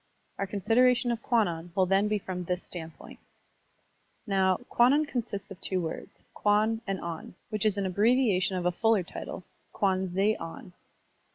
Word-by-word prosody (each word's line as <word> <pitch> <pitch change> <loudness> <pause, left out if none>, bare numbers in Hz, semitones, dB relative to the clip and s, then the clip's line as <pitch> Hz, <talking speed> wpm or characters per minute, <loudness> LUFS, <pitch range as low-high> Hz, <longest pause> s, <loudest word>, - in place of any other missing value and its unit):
Our 195 - -1
consideration 240 +5 +3
of 230 -1 -3
Kwannon 175 -9 0
will 190 -2 +4
then 195 +3 +3
be 210 0 +1
from 185 -2 -5
this 180 +1 -2
standpoint. 165 -2 -9 1.1
Now, 190 -3 +2
Kwannon 275 +6 +4
consists 215 -8 -4
of 195 - -10
two 185 - -1
words, 165 -2 -6
kwan 215 +2 +2
and 195 -1 -1
on, 170 +1 -6 0.2
which 215 0 +1
is 205 -1 +1
an 200 - 0
abbreviation 200 -2 +2
of 180 - -3
a 180 - +3
fuller 220 +1 +2
title, 175 - -7 0.3
Kwan 190 -1 +1
ze 195 +4 +2
on. 165 +2 -9
195 Hz, 160 wpm, -28 LUFS, 180-220 Hz, 1.1 s, will